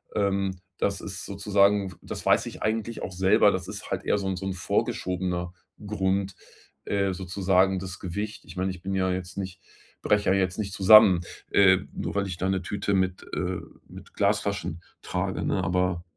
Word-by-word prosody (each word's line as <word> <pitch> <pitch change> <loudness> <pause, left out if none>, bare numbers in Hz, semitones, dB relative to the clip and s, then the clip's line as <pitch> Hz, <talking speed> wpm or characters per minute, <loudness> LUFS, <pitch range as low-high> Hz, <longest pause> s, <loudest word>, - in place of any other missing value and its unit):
Ähm, 95 -2 0 0.2
das 100 -2 0
ist 95 -1 -6
sozusagen 100 -1 +2
w - - -14
das - - -7
weiß - - +4
ich - - -9
eigentlich 110 +1 -2
auch 95 - -5
selber. 95 +1 +4
Das - - -3
ist - - -7
halt - - -2
eher - - +2
so 100 -1 -3
'n 95 - -1
so 95 - -5
'n 95 - -2
vorgeschobener 90 0 -2 0.3
Grund. 95 -2 -1 0.5
Äh, 100 -1 0
sozusagen 95 +1 +1
das 95 0 -7
Gewicht. 105 +4 -5
Ich - - -12
meine, 95 +1 0
ich 90 -1 -9
bin 95 +2 -4
ja 95 -1 +1
jetzt 90 0 -5
nicht 95 -3 -5 0.4
breche 105 0 +2
ja 95 - +4
jetzt 95 +1 0
nicht 100 -2 -2
zusammen, 100 -2 +7 0.3
äh, 95 -2 +6
nur - - -4
weil 100 -1 0
ich 90 -2 -5
da 95 - -1
'ne 95 -1 0
Tüte 100 +2 -2
mit 95 -1 0
äh, 90 0 -2 0.3
mit - - -13
Glasflaschen 100 -4 0 0.2
trage, - - -2
ne? 95 - 0
Aber 90 0 0
95 Hz, 190 wpm, -26 LUFS, 90-100 Hz, 0.5 s, zusammen